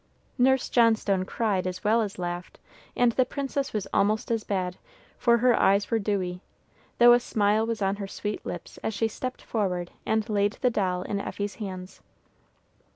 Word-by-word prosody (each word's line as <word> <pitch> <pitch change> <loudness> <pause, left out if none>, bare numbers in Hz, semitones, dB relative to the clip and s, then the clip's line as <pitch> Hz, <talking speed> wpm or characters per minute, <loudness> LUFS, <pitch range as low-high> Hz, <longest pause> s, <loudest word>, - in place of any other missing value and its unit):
Nurse 265 +1 +3
Johnstone 220 -5 +3
cried 195 -4 -1
as 185 0 -5
well 225 +2 +3
as 205 -3 -4
laughed, 175 0 -5 0.4
and 245 -1 +4
the 255 - +3
princess 275 +1 -3
was 210 -3 -2
almost 215 +3 +1
as 225 -2 0
bad, 185 -3 -2 0.4
for 235 -1 +4
her 245 +1 +4
eyes 200 +3 +3
were 225 - +3
dewy, 185 -3 -2 0.6
though 240 0 +8
a 240 - +5
smile 215 -1 +1
was 230 -3 -2
on 195 +1 0
her 200 -1 -5
sweet 210 +2 -4
lips - - -7
as 220 - -3
she 225 +2 +1
stepped 255 +4 -6
forward 180 -5 -2
and 220 -1 0
laid 205 -1 +1
the 250 - 0
doll 185 -4 0
in 200 +1 -2
Effie's 205 0 -4
hands. 185 -2 -7
210 Hz, 175 wpm, -27 LUFS, 195-230 Hz, 0.6 s, though